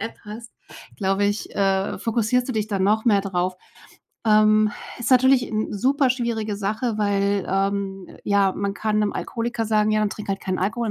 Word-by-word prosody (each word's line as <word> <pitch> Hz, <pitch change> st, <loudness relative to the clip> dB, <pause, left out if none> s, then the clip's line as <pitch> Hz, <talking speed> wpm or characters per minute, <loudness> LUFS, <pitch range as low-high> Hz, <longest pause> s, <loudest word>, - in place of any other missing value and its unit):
App 225 Hz, +2 st, -6 dB
hast, 225 Hz, +3 st, -9 dB, 0.5 s
glaube 195 Hz, 0 st, 0 dB
ich, 205 Hz, +1 st, -3 dB
äh, 195 Hz, -1 st, 0 dB
fokussierst 235 Hz, +2 st, 0 dB
du -, -, -1 dB
dich 215 Hz, -2 st, -1 dB
dann 195 Hz, -2 st, -1 dB
noch 215 Hz, +3 st, +2 dB
mehr 205 Hz, -3 st, +4 dB
drauf. 185 Hz, -1 st, -1 dB, 0.7 s
Ähm, 215 Hz, 0 st, +4 dB, 0.3 s
ist 240 Hz, -, -3 dB
natürlich 260 Hz, 0 st, +5 dB
'n 215 Hz, 0 st, -2 dB
super 265 Hz, +5 st, +2 dB
schwierige 230 Hz, -4 st, -2 dB
Sache, 215 Hz, +3 st, -2 dB
weil, 200 Hz, -1 st, +1 dB
ähm, 195 Hz, 0 st, -1 dB, 0.2 s
ja, 200 Hz, -1 st, +2 dB
man 200 Hz, +1 st, -3 dB
kann 215 Hz, 0 st, -1 dB
'nem 210 Hz, -1 st, 0 dB
Alkoholiker 235 Hz, -1 st, -3 dB
sagen: 215 Hz, 0 st, +2 dB
„Ja, 215 Hz, -, +2 dB
dann 210 Hz, -1 st, 0 dB
trink 210 Hz, -, -8 dB
halt 195 Hz, 0 st, -2 dB
keinen 185 Hz, -1 st, -3 dB
Alkohol 220 Hz, +3 st, -1 dB
210 Hz, 180 wpm, -23 LUFS, 200-225 Hz, 0.7 s, natürlich